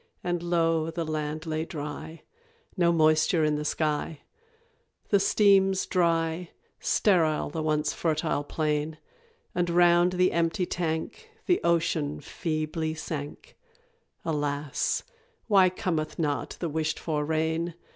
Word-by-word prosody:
And 175 -1 -1
lo! 165 -2 +1
the 165 0 -3
land 155 +1 -3
lay 155 0 -2
dry 155 +1 -7 0.5
No 175 -3 +3
moisture 155 0 +3
in 150 0 +2
the 150 0 -2
sky; 150 0 -1 0.9
The 200 - +4
streams 195 -1 +4
dry 165 -1 0 0.3
sterile 165 -8 +2
the 160 - -3
once 150 -1 0
fertile 155 -3 0
plain; 150 +1 -1 0.6
And 175 -1 0
round 175 +1 +4
the 180 0 +3
empty 170 +2 +1
tank 175 - -3 0.2
The 355 - +2
ocean 165 -3 +1
feebly 155 -1 -3
sank 145 -2 -6 0.7
Alas, 145 -2 -1 0.4
why 195 -4 +5
cometh 175 -5 -2
not 150 -3 -2
the 170 - -2
wished 155 0 -1
for 150 -3 -2
rain! 160 +2 -1
160 Hz, 120 wpm, -27 LUFS, 155-175 Hz, 0.9 s, why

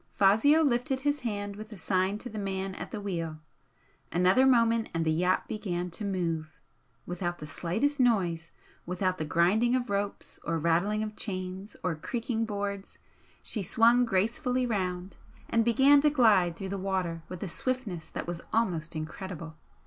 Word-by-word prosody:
Fazio 225 +11 +5
lifted 260 -1 +1
his 290 +1 +1
hand 205 -4 -3
with 215 +2 -9
a 210 - -8
sign 185 +3 0
to 235 - -7
the 215 -2 -6
man 195 -1 -3
at - - -6
the 215 - -5
wheel. 165 -6 -3 0.7
Another 185 +9 +4
moment 230 -3 +3
and 165 0 0
the 160 - +2
yacht 180 +4 +1
began 180 -4 -3
to 190 - -5
move. 165 -5 -2 0.5
Without 175 0 -3
the 150 - -8
slightest 220 - -1
noise, 180 -10 +2 0.4
without 185 +1 -1
the 155 - -1
grinding 200 +10 +3
of 245 -4 -1
ropes, 200 0 -3
or 165 - -1
rattling 175 +7 +1
of 215 0 -5
chains, 185 0 -5
or 180 - 0
creaking 230 +7 -2
boards, 200 -2 -4 0.5
she 215 - -3
swung 230 +6 +4
gracefully 245 +5 0
round, 185 -4 -2 0.3
and 230 0 +2
began 270 +5 +6
to 300 - +5
glide 210 - +4
through 190 +2 -6
the 200 0 -3
water 185 -3 -2
with 180 +1 -6
a - - -3
swiftness 195 -6 -3
that - - -5
was 175 -1 -5
almost 170 -8 0
incredible. 165 0 -6
195 Hz, 165 wpm, -29 LUFS, 175-230 Hz, 0.7 s, began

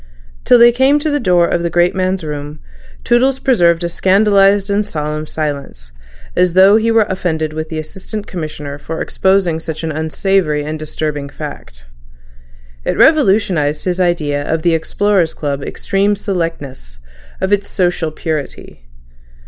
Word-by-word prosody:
Till 245 - +6
they 240 0 +7
came 265 +4 +3
to 300 +1 -1
the 290 - 0
door 180 -7 +3
of 170 - -1
the 170 - -1
great 175 +1 +2
man's 185 -1 -1
room, 150 0 -6 0.4
Toodles 255 +2 +2
preserved 175 -11 +2
a - - 0
scandalised 195 +2 +3
and 205 +1 +1
solemn 155 -3 -4
silence, 140 - -5 0.4
as 180 -1 +2
though 190 +3 +6
he 225 +1 +1
were 225 -2 +4
offended 160 -4 -2
with 155 0 -5
the 160 - -5
Assistant 190 +6 -7
Commissioner 150 -5 -6
for 160 +3 -6
exposing 190 -4 +1
such 160 0 -6
an 160 - -2
unsavoury 160 0 0
and 155 +1 -5
disturbing 150 -2 -4
fact. - - -9 1.0
It - - -2
revolutionised 190 - +2
his 180 0 -1
idea 155 -5 0
of 160 0 -1
the 170 - +3
Explorers' 180 +1 0
Club's 140 -2 -4
extreme 200 +1 0
selectness, 165 - -5 0.4
of 190 +2 0
its 200 0 0
social 175 -4 0
purity. 155 - -6
170 Hz, 150 wpm, -16 LUFS, 155-195 Hz, 1.0 s, they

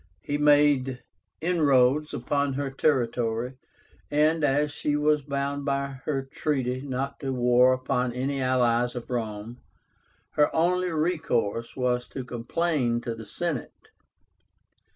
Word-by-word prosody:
He 145 0 -2
made 145 -3 +3 0.4
inroads 150 -4 +3
upon 140 +3 -1
her 140 0 -3
territory, 125 -3 0 0.5
and, 155 +2 +2
as 145 +1 +2
she 145 0 -1
was 150 0 +2
bound 140 0 -3
by 140 -1 -2
her 135 -3 -1
treaty 130 -2 -2
not 135 0 -4
to 135 -2 -3
war 125 0 +4
upon 130 -1 0
any 135 +3 -2
allies 125 -1 +2
of 120 +1 -7
Rome, 115 0 -4 0.7
her 150 -1 +3
only 180 +2 +2
recourse 155 - -1
was 125 -1 0
to 130 - -6
complain 125 0 -1
to 120 - -3
the 110 -1 -10
Senate. 160 +4 -4
135 Hz, 125 wpm, -26 LUFS, 125-150 Hz, 0.7 s, war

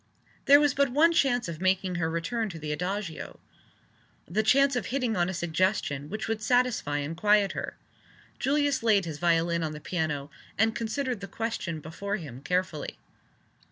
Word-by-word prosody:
There 285 0 +8
was 290 -3 +3
but 280 -1 +2
one 315 +6 +4
chance 245 - +2
of 165 -1 -6
making 185 0 +1
her 160 - +1
return 210 +8 -2
to 170 - -8
the 155 -1 -5
Adagio 180 +2 -4 0.9
the 200 +7 +1
chance 275 +5 +4
of 245 - -2
hitting 250 -4 -1
on 175 0 +1
a - - -3
suggestion 170 -4 0
which 215 +2 -4
would 225 -1 -2
satisfy 245 - +1
and 145 +3 -3
quiet 205 +2 +3
her. - - -5 0.6
Julius 285 +1 +1
laid 210 -5 +3
his 155 -3 -6
violin 170 0 +2
on 155 -1 -2
the 150 - -7
piano, 150 -4 -3 0.3
and 225 +1 +3
considered 245 +1 -2
the 200 - -7
question 195 -8 -3
before 200 +6 -4
him 145 - -8
carefully. 180 -1 -2
195 Hz, 170 wpm, -28 LUFS, 165-235 Hz, 0.9 s, There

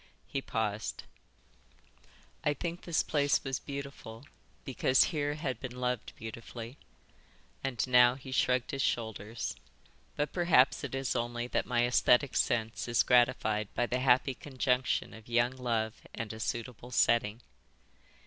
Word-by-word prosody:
He 135 - -3
paused. 110 -5 -3 1.4
"I 150 - +1
think 170 +4 -4
this 170 -2 0
place 145 -5 +1
was 135 -1 -2
beautiful 140 -4 -8 0.4
because 130 -1 +3
here 145 -1 0
I 150 - -9
had 130 -6 -2
been 125 -1 -7
loved 125 -2 -2
beautifully." 115 +3 -8 0.8
And 135 -3 -1
now 125 0 +6
he 130 0 -10
shrugged 125 -1 +1
his 135 - -2
shoulders. 110 -3 -2 0.6
"But 145 - -2
perhaps 170 -7 +4
it - - -4
is 135 -1 -1
only 120 0 -2
that - - -1
my 120 -1 +2
Êsthetic 125 +2 +3
sense 115 0 0
is 120 -1 +3
gratified 120 -4 +2
by 120 - +2
the 125 +1 -1
happy 130 +1 +3
conjunction 130 -1 -1
of 110 +1 -13
young 120 +1 +3
love 115 -4 -2
and 115 -1 -4
a 110 - -9
suitable 120 +1 -4
setting." 115 -2 +2
125 Hz, 140 wpm, -31 LUFS, 115-135 Hz, 1.4 s, now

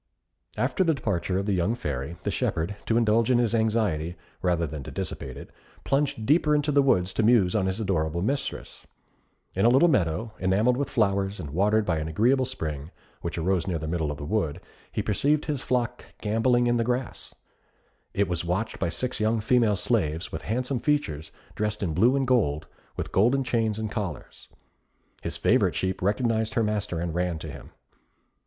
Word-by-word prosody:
After 190 - +1
the 165 -3 +2
departure 95 -7 -1
of 100 - -1
the 100 - +1
young 95 +5 +1
Fairy, 75 - -4
the - - -1
shepherd, 85 +6 -1
to 115 - +3
indulge 115 0 +3
in 125 - +4
his 120 -2 +2
anxiety, 105 -8 +1 0.3
rather 85 -2 +1
than 75 -1 -6
to 65 - -8
dissipate 65 -2 -5
it, - - -10 0.3
plunged 135 -5 0
deeper 150 +2 +4
into 150 0 +1
the 140 0 +5
woods 95 -9 +2
to - - +1
muse 105 -5 +4
on 95 -3 +2
his 95 +3 -2
adorable 85 -5 0
mistress. 140 +6 -3 0.7
In 95 - 0
a 115 - +6
little 135 +8 +5
meadow, 110 - +1
enamelled 100 +7 +2
with 140 +1 -2
flowers, 100 -3 +1
and 75 - -6
watered 105 +6 +2
by 85 -4 0
an 80 - -3
agreeable 125 - +2
spring, 75 - -4 0.3
which 85 - -4
arose 90 +2 0
near 90 -3 0
the 80 - -5
middle 80 -2 -1
of 75 - -4
the 70 - -6
wood, 85 -4 -1 0.3
he - - -2
perceived 145 +8 +1
his 145 -4 -2
flock 125 -2 -1 0.2
gambolling 120 +3 +2
in 120 0 +2
the 115 - +2
grass. 125 +2 -3 0.8
It 100 0 +1
was 85 -2 -1
watched 90 +6 -2
by - - 0
six 125 +8 -3
young 110 +1 +2
female 115 -1 +3
slaves, 85 -7 0
with - - -5
handsome 125 +3 -1
features, 80 - -1 0.2
dressed 105 -1 -2
in 85 -5 -1
blue 115 - +4
and 135 -1 +1
gold, 90 - +1 0.3
with - - -4
golden 125 +8 +3
chains 115 -3 0
and 110 -1 -3
collars. 100 - -5 0.7
His - - -4
favourite - - +3
sheep 95 0 -1
recognised 110 +3 0
her 115 - +3
master 105 -5 -1
and 85 -1 -2
ran 90 -1 -1
to 80 - -7
him. - - -11
105 Hz, 190 wpm, -26 LUFS, 85-120 Hz, 0.8 s, a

